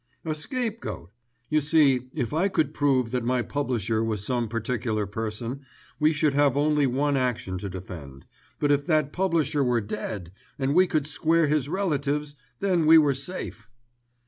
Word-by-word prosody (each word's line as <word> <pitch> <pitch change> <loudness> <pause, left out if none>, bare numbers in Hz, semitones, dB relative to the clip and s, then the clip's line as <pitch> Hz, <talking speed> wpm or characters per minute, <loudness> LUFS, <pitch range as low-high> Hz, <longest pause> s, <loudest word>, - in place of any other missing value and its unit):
"A 160 - -1
scapegoat. 220 - -4 0.4
You 155 0 +3
see 140 -4 +3
if 120 - -2
I 170 +5 +2
could 160 -6 0
prove 130 -6 +1
that 125 -1 -1
my 125 0 +1
publisher 115 -6 -1
was 110 -3 -2
some 120 -2 -1
particular 110 -1 -2
person, 110 +5 -4 0.4
we 150 +1 +4
should 150 -2 +1
have 140 -1 +3
only 150 -1 +3
one 140 +3 +1
action 120 -8 -1
to 100 - -5
defend; 85 -7 -9 0.3
but 145 -1 +2
if 145 0 +1
that 155 -3 +1
publisher 165 -6 +1
were 125 -2 +2
dead, 100 -4 -5 0.3
and 135 -1 0
we 185 +3 +5
could 155 -4 0
square 160 +2 +2
his 145 -2 0
relatives, 150 -5 -1 0.3
then 180 -5 +2
we 160 +1 +9
were 145 -3 +4
safe. 135 -5 -5
140 Hz, 165 wpm, -26 LUFS, 115-155 Hz, 0.4 s, we